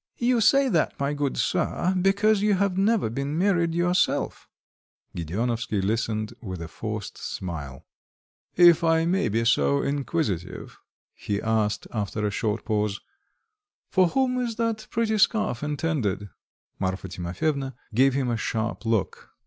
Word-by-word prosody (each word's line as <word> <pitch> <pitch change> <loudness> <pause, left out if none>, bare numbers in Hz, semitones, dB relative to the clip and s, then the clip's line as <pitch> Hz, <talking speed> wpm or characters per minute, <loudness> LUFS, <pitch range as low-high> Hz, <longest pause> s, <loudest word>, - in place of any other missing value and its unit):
"You 240 -1 +2
say 275 +5 +5
that, 170 -10 0
my 140 +1 0
good 145 -2 -2
sir, 180 +1 0
because 200 +2 +3
you 210 -1 +3
have 195 -1 +1
never 205 - +2
been 140 +6 -3
married 170 -3 +2
yourself." 175 +1 0 0.7
Gedeonovsky 110 +6 -2
listened 110 +2 -1
with 95 -6 -6
a 85 - -6
forced 105 +4 -6
smile. 75 -7 -6 0.7
"If 175 -2 +7
I 165 0 +3
may 190 +3 +1
be 115 +2 0
so 70 -11 +3
inquisitive," 140 - -3 0.3
he 100 -1 -3
asked, 110 -2 0
after 105 -1 -2
a 105 - 0
short 105 +2 -2
pause, 105 -2 0 0.9
"for 185 -2 +4
whom 255 +5 +1
is 235 -2 -2
that 225 -1 -2
pretty 220 -2 0
scarf 215 - +2
intended?" 145 - -2 0.5
Marfa 95 0 -2
Timofyevna 125 - -2 0.2
gave 130 +3 +4
him 130 -3 0
a 115 - 0
sharp 115 +1 -3
look. 110 -5 -1
135 Hz, 140 wpm, -25 LUFS, -, 0.9 s, If